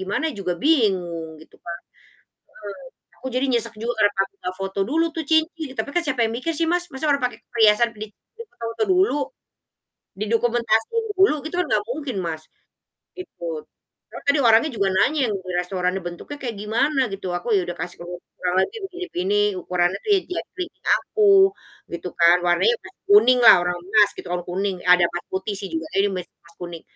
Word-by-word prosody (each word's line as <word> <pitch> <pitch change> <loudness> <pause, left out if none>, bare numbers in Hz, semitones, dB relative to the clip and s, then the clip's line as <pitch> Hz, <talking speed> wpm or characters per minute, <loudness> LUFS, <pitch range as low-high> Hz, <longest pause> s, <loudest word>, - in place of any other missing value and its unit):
gimana 205 +12 -1
juga 185 -2 -1
bingung 180 - +1
gitu 160 - -18
kan. 170 0 -5 1.2
Mhm, - - -34
aku - - -9
jadi 255 +2 +1
nyesek 230 -2 0
juga 230 +3 -2
karena 205 -1 +4
kami 195 0 0
gak 185 - -3
foto 195 0 -3
dulu 320 +5 +2
tuh 325 -1 -4
cincin. 320 0 +1
Tapi - - -2
kan 350 - +2
siapa 260 -4 -1
yang 225 - 0
mikir 330 +6 -2
sih 330 - 0
Mas, 355 0 +1
masa 265 - -4
orang 280 - +3
pake - - -7 0.2
perhiasan 225 0 +4
di 215 - -5 0.3
difoto-foto 360 - -4
dulu, 370 -1 +3 1.0
didokumentasiin 230 - 0
dulu, 385 -3 +5
gitu 315 +3 -5
kan 360 - +1
gak 210 - +2
mungkin, 260 -2 -4
Mas. 160 -2 -4 0.8
Ikut, 165 - -6 0.5
soalnya - - -10
tadi 280 +1 +3
orangnya 230 +4 +5
juga 200 -3 0
nanya 295 +10 +2
yang - - -1
di 185 -1 -8
restoran 180 0 -1
nih, 195 - -3
"Bentuknya 175 +12 -8
kayak 240 -4 -4
gimana?" 235 +8 0
Gitu. 195 -1 -6
Aku 175 - -9
ya 195 - +4
udah 175 - -4
kasih 175 +1 -6
tahu, 175 +1 -8 0.3
"Kurang 180 0 -1
lebih - - -10
begini 365 -1 -6
begini, 200 +3 +1 0.2
ukurannya 180 +2 0
di 415 - +5 0.2
jari 365 +1 -5 0.3
aku" 395 -2 +4 0.4
gitu 175 +1 -5
kan, 170 +1 +6
"warnanya 175 - +3
pasti - - -15
kuning 255 -12 +7
lah - - +11
orang 180 0 -1
emas." 205 +2 +4
Gitu - - -8
kan, 180 - -1
kuning, 190 +2 -1
ada 180 -1 +5
emas 175 +1 -4
putih 190 +2 -3
sih 195 - -5
juga, 160 -1 -3
"ini 200 - +3
mas 180 - -4 0.2
emas 170 - -19
kuning." 175 -2 -7
215 Hz, 190 wpm, -22 LUFS, 180-290 Hz, 1.2 s, lah